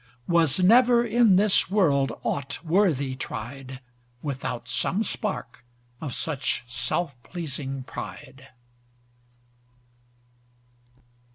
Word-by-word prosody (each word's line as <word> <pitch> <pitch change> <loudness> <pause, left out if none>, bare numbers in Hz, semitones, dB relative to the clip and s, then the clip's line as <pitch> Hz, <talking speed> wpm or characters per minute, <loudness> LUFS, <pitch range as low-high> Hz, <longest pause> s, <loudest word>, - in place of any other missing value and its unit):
Was 165 -3 +3
never 240 +5 +5
in 235 -5 +4
this 200 -1 +4
world 145 -9 +3
ought 140 +4 -3
worthy 160 -7 +2
tried, 130 +1 -6 0.4
Without 135 -4 -4
some 205 +5 0
spark 195 - -4 0.4
of 145 -6 -4
such 145 -6 -1
self 140 +6 -2
pleasing 135 -2 -5
pride. 130 0 -9
150 Hz, 85 wpm, -26 LUFS, 135-190 Hz, 0.4 s, never